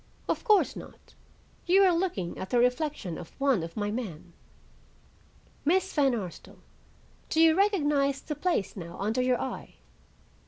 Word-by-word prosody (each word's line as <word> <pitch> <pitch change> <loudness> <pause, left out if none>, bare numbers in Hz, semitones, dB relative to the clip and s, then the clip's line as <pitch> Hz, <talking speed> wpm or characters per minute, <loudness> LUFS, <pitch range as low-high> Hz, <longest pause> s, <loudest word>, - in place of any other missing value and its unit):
"Of - - -1
course 425 -4 +3
not. - - -12 0.5
You 385 +3 +6
are 370 -2 +5
looking 335 - -2
at 190 - -5
the 245 - +1
reflection 250 - 0
of 175 - -12
one 275 -8 +2
of 165 +3 -7
my 205 -1 -1
men. 180 -8 -6 1.3
Miss 375 +5 +1
Van 275 -5 +3
Arsdale, 185 -6 -8 0.7
do 315 - 0
you 325 0 +7
recognize 295 -9 +2
the 300 - -5
place 295 - -1
now 170 -3 -8
under 220 +5 0
your 250 -1 +1
eye?" 265 - -6
265 Hz, 150 wpm, -28 LUFS, 200-325 Hz, 1.3 s, you